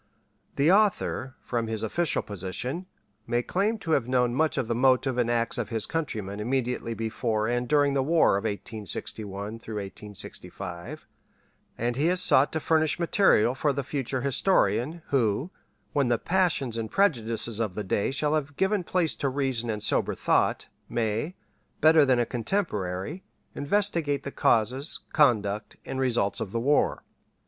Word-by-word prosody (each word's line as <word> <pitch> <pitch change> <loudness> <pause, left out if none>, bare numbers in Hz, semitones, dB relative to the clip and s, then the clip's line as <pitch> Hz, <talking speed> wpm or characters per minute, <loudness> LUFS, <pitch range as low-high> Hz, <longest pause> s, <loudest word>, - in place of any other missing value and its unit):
The 145 +5 +4
author, 195 -10 +1
from 115 -2 -2
his 110 -1 -2
official 170 +9 0
position, 105 - -4 0.4
may 120 0 0
claim 205 - 0
to 165 - -1
have 135 -6 +2
known 125 -1 +2
much 155 +4 +1
of 125 - 0
the 115 - 0
motives 130 +1 +2
and 120 -1 +1
acts 115 0 0
of - - -3
his 110 -3 -1
countrymen 110 -11 -4
immediately 125 0 -1
before 110 -1 -1
and 120 +1 -1
during 145 0 +3
the 135 - +2
war 160 -6 +3
of 100 - -2
1861 105 0 -4
'65, 95 -4 -7 0.7
and 120 +1 -1
he 150 +4 +2
has 180 +1 +2
sought 140 -5 +4
to 160 - 0
furnish 155 0 +1
material 170 - +3
far 145 +2 0
the 140 +1 -2
future 130 -1 -2
historian, 150 +1 +1
who, 130 - +1 0.4
when 140 -3 +2
the 120 -1 +2
passions 160 -8 0
and 110 -1 -3
prejudices 115 - +1
of 105 -5 -2
the 105 - -3
day 100 +1 0
shall 150 +2 0
have 145 -2 -2
given 190 0 +1
place 175 -2 0
to 140 - 0
reason 130 -4 -1
and 105 -2 -2
sober - - +1
thought, - - +1 0.2
may, 120 - -1 0.4
better 155 -1 +6
than 130 -2 +3
a 120 - +2
contemporary, 115 - -2 0.3
investigate 160 -4 0
the 140 - -5
causes, 125 +8 +1
conduct, 110 - +2
and 135 - -4
results 120 -6 +1
of 110 -4 -4
the 115 - -1
war. 145 +5 +2
125 Hz, 155 wpm, -27 LUFS, 110-150 Hz, 0.7 s, better